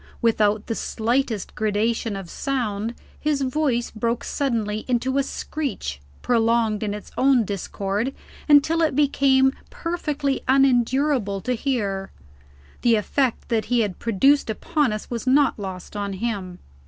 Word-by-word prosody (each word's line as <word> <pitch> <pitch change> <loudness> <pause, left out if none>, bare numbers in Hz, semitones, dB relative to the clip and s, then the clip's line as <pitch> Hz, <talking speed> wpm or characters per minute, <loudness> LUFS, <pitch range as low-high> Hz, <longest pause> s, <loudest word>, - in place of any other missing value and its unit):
Without 215 -2 +2
the 230 - -2
slightest 225 -1 -1
gradation 215 +1 0
of 195 -2 -6
sound, 230 -2 -2 0.2
his 295 -2 0
voice 255 -3 0
broke 230 +1 -1
suddenly 220 -6 -1
into 260 +2 +1
a - - +4
screech, 265 - -4 0.2
prolonged 230 -2 +2
in 205 -2 -2
its 210 - -10
own 260 -4 +4
discord 200 +4 -2 0.4
until 300 +3 +5
it 310 -5 +2
became 270 -2 +4 0.2
perfectly 300 -5 -2
unendurable 260 -4 +2
to 250 - -1
hear. 210 -7 -2 0.7
The 235 -1 +4
effect 245 +4 0
that 225 -2 +1
he 245 -1 +2
had 205 -4 -2
produced 235 +5 +3
upon 290 +4 0
us 215 0 -4
was 235 +2 -4
not 275 -2 +3
lost 190 0 -7
on 200 -1 -3
him. 190 -3 -3
235 Hz, 135 wpm, -23 LUFS, 210-270 Hz, 0.7 s, until